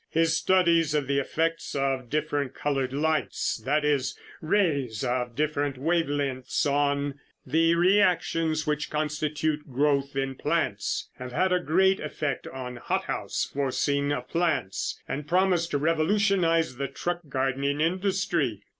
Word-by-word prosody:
His 165 0 +2
studies 170 -4 +3
of 145 -2 +1
the 140 +1 +1
effects 165 +4 -1
of 135 -3 -1
different 145 -2 -1
colored 135 -3 -1
lights, 155 +2 0
that 150 +5 +1
is, 145 -3 0 0.2
rays 150 - +1
of 125 -1 -1
different 145 -2 -1
wave 165 +3 +1
lengths, 135 -3 -1
on 145 0 0 0.3
the 165 +5 +3
reactions 170 -4 +2
which 150 0 -1
constitute 150 -1 -2
growth 140 +1 +1
in 135 0 -1
plants - - -1
have 125 0 -7
had 185 +5 +2
a 180 - +3
great 190 +4 +3
effect 150 -2 -3
on 125 -2 -6
hothouse - - -2
forcing 140 +1 0
of 125 -4 -3
plants 155 - -1
and 145 +1 -4
promise 180 0 +2
to 145 - -1
revolutionize 165 - +2
the 140 +1 -2
truck 175 +4 -3
gardening 135 +1 0
industry. 170 - 0
150 Hz, 135 wpm, -27 LUFS, 135-165 Hz, 0.3 s, studies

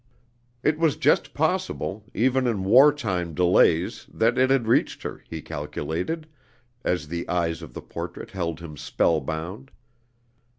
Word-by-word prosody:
It 150 +1 +2
was 165 -3 +3
just - - +2
possible, 160 - -1
even 130 +2 +2
in 105 -5 0
war 130 +9 +7
time 90 - -3
delays, 90 -1 +3
that 115 +2 +2
it 130 +1 +3
had 135 -3 +3
reached 115 - +2
her, - - -6
he 80 -1 -6
calculated, 80 - -4 0.6
as 90 -4 -1
the 85 +2 -4
eyes 85 -2 0
of 80 - -11
the - - -7
portrait - - -7
held 85 -3 -3
him 75 -3 -9
spellbound. 80 - -1
95 Hz, 140 wpm, -25 LUFS, 80-130 Hz, 0.6 s, war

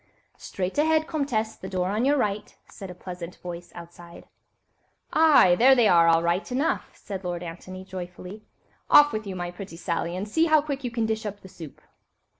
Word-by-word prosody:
"Straight 190 +7 -4
ahead, 315 +1 +3
Comtesse, 245 -9 -2
the 190 - -8
door 185 -1 -1
on 215 +5 0
your 290 +2 +3
right," 210 -4 -2
said 195 - -9
a 180 - -9
pleasant 180 -1 -8
voice 175 -1 -9
outside. 170 0 -12 0.9
"Aye! 305 - +6
there 265 +3 +7
they 240 -4 +4
are, 170 -3 +5
all 165 0 +4
right 175 +7 -1
enough," 275 +6 -1
said 195 -2 -7
Lord 175 -1 -4
Antony, 185 +2 -9
joyfully; 185 +2 -8 0.5
"off 295 0 +7
with 215 -1 -4
you, 190 - -5
my 175 -1 -4
pretty 180 -1 -10
Sally, 170 0 -3
and 190 +3 -4
see 320 +10 +2
how 310 -1 +5
quickly 280 -3 -4
you - - -18
can 230 -1 -1
dish 220 0 -2
up 205 0 -7
the - - -12
soup." 165 -5 -12
190 Hz, 195 wpm, -25 LUFS, 175-245 Hz, 0.9 s, there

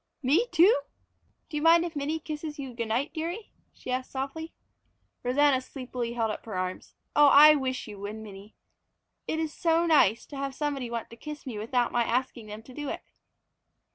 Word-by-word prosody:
"Me 320 - +3
too? 350 +2 +6 0.7
Do 305 - -4
you - - -1
mind 335 +2 +6
if 335 -2 -6
Minnie 295 +3 -1
kisses 305 0 -6
you 270 -3 -6
good 235 -1 -3
night, 240 +7 -1
dearie?" 345 +7 -4 0.2
she 255 - -8
asked 255 0 -2
softly. 280 +5 -5 0.7
Rosanna 265 +1 +3
sleepily 250 -3 -5
held 225 -2 0
up - - -6
her 205 -4 -4
arms. 185 0 -4 0.2
"Oh, 295 0 +7
I 295 +2 +9
wish 260 -4 -2
you 205 -2 -9
would, 205 +2 -5
Minnie! 210 -1 -11 0.7
It 315 - -1
is 320 -1 -2
so 335 0 +2
nice 280 - +4
to 285 - -9
have 275 -1 -3
somebody 280 -5 -2
want 235 -1 -5
to - - -9
kiss 300 +4 -8
me 235 -6 -5
without 240 +3 0
my 240 - +2
asking 240 -1 -2
them 210 +1 -8
to 255 - -13
do 290 +2 -5
it." - - -5
270 Hz, 195 wpm, -28 LUFS, 235-305 Hz, 0.7 s, I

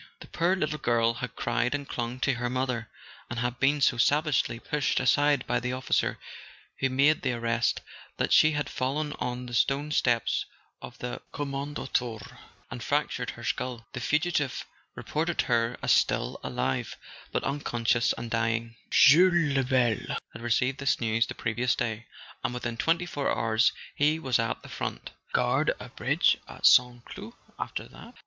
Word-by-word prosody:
The - - -10
poor 175 +3 +1
little 155 -4 -2
girl 115 -1 +2
had 125 +1 -6
cried 120 +3 0
and 140 -1 -5
clung 120 +1 -4
to 140 - +2
her 120 0 -2
mother, 125 -3 -2 0.4
and 120 - -5
had 120 0 -2
been 140 +2 +2
so 125 - +3
savagely 145 0 +2
pushed 145 +3 0
aside 145 +2 +3
by 120 - 0
the 125 +1 -3
officer 130 0 0 0.6
who 135 - +1
made 140 +4 +3
the 125 -2 0
arrest 115 0 0 0.4
that - - +1
she 155 0 +6
had 145 0 -1
fallen 145 +3 -2
on 125 0 -3
the 120 - -9
stone 140 +4 +1
steps 120 -6 +1 0.3
of 125 - -10
the 125 0 -5
" - - -39
Kommandantur 135 -6 -3
" - - -32
and - - -6
fractured - - -1
her - - -8
skull. 120 -3 -3
The 125 - -4
fugitive 150 +1 0 0.3
reported 165 +2 -1
her 120 0 +1
as - - +2
still - - +2
alive, 65 - -2 0.3
but - - -1
unconscious, 120 -4 +1
and 115 -1 -7
dying. 115 0 -1
Jules 170 -1 +6
Lebel 125 -4 +1 0.2
had 115 - -9
received 125 +3 0
this 140 -1 +1
news 115 0 +1
the - - -6
previous 120 +1 0
day; 115 -1 -3 0.4
and 120 +1 -2
within 120 -1 -3
twenty 165 +8 +1
four 145 -5 -2
hours 115 +1 +2 0.2
he 150 +2 +2
was 130 -7 0
at 115 0 -2
the - - -10
front. - - -5 0.2
Guard - - +2
a - - -9
bridge - - +2
at - - -5
St. 120 -1 +5
Cloud - - -9 0.3
after - - -4
that? - - -14
125 Hz, 170 wpm, -28 LUFS, 120-145 Hz, 0.6 s, she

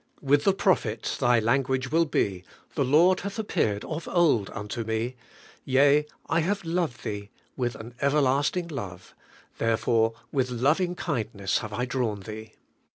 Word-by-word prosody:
With 145 +1 +3
the 195 - +5
prophet, 125 - +1
thy 120 0 +4
language 130 +2 0
will 165 +1 +4
be, 95 - -1 0.3
*The 140 - +1
Lord 165 +8 +4
hath 200 +1 -5
appeared 105 - 0
of 160 +1 -5
old 155 - +3
unto 105 +3 -4
me: 110 +3 -2 0.5
yea, 140 +3 +4 0.2
I 165 - +2
have 195 +3 -1
loved 165 -6 -1
thee 100 -1 -5 0.3
with 120 -3 -2
an 115 +2 -9
everlasting 145 +5 +2
love, 95 - -7 0.5
therefore 115 0 +2 0.2
with 130 -3 0
loving 150 +9 +1
kindness 110 - -1
have 110 - -6
I 120 +4 -1
drawn 125 -6 -2
thee.' 110 +2 -8
130 Hz, 150 wpm, -27 LUFS, 110-155 Hz, 0.5 s, the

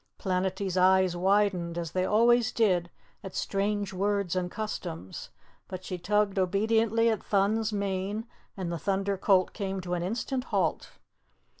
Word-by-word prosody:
Planetty's 190 0 -1
eyes 185 -1 +4
widened, 185 -2 +1
as 170 -2 -3
they 185 0 0
always 235 +3 +4
did 180 -6 +2 0.3
at 190 - -8
strange 205 0 -1
words 200 -1 0
and 180 -1 -1
customs, 95 - -6 0.4
but 185 0 -7
she 180 -2 -5
tugged 200 +2 +1
obediently 220 +4 +2
at 220 - -2
Thun's 210 +2 +1
mane 200 +1 -2 0.3
and 180 -3 -3
the 170 - -3
Thunder 195 +1 0
Colt 190 -1 +2
came 195 -2 -3
to 180 0 -4
an 175 - -1
instant 240 +7 -2
halt. - - -1
195 Hz, 145 wpm, -28 LUFS, 185-210 Hz, 0.4 s, eyes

